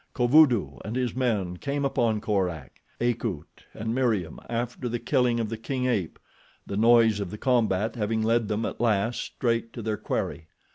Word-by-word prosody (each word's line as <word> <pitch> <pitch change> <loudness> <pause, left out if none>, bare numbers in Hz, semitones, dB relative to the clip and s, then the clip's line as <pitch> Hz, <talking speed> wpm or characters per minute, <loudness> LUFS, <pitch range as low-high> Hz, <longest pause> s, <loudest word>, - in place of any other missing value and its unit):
Kovudoo 120 - +4
and 110 +3 -5
his 125 -3 -1
men 105 -9 0
came 140 +6 -2
upon 115 -6 +1
Korak, 95 - -2 0.2
Akut 115 -9 -3
and 110 +1 -4
Meriem 110 -11 0
after 120 +2 -3
the 120 - -1
killing 120 -1 +1
of 115 - -1
the 115 0 -5
king 130 +2 -2
ape, 105 -10 -1 0.5
the 100 - -5
noise 115 0 +5
of 100 -3 -3
the 105 - -7
combat 110 -4 +1
having 110 0 -1
led 115 0 +2
them 105 +2 -1
at - - -5
last 115 0 +1
straight 115 -2 -2
to 115 - -6
their 110 -1 -1
quarry. 80 - -3
115 Hz, 175 wpm, -26 LUFS, 105-120 Hz, 0.5 s, noise